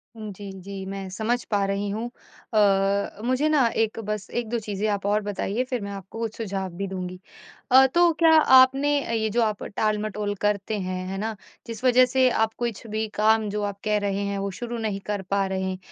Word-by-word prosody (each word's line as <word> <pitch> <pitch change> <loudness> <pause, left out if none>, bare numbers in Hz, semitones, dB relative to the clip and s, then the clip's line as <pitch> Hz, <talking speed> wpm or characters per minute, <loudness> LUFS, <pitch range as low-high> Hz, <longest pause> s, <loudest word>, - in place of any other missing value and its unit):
उम, 215 -2 -7
जी, 200 +1 -8
जी, 195 0 -7
मैं 195 0 -5
समझ 220 +6 -1
पा 205 -1 +2
रही 200 +1 -1
हूँ। 220 +4 -3 0.4
अ - - +2
अ, 200 0 +2
मुझे 255 +5 +2
ना 285 -6 +4 0.2
एक 220 0 -3
बस 210 -1 -4
1-2 235 0 -2
चीज़ें 210 -1 -3
आप 200 -1 -2
और 205 +1 +2
बताइए, 205 +3 -2
फिर 250 -2 -3
मैं 200 0 -5
आपको 195 +2 -8
कुछ 225 -2 -4
सुझाव 195 -4 -3
भी 195 +1 -2
दूँगी। 185 -1 -5 0.5
अ, 265 +1 +8
तो 345 0 +6
क्या 330 -1 +6
आपने 275 0 +5
अ, - - -4
ये 220 -1 0
जो 235 +3 +1
आप 215 -2 -1
टाल-मटोल 210 0 -1
करते 210 +1 0
हैं, 185 -1 -3
है 190 +1 -4
ना, 220 +2 -3 0.3
जिस 230 +1 -7
वजह 255 0 +6
से 260 -1 +5
आप 225 -2 +1
कुछ 235 -3 -3
भी 220 +1 -2
काम 220 +1 +3
जो 210 +1 -2
आप 200 -1 -4
कह 210 -1 +1
रहे 200 0 -1
हैं, 200 0 -2
वो 195 0 -2
शुरू 240 0 -4
नहीं 215 -3 -2
कर 205 -1 -2
पा 200 0 +2
रहें। 190 0 -2
210 Hz, 215 wpm, -25 LUFS, 195-230 Hz, 0.5 s, अ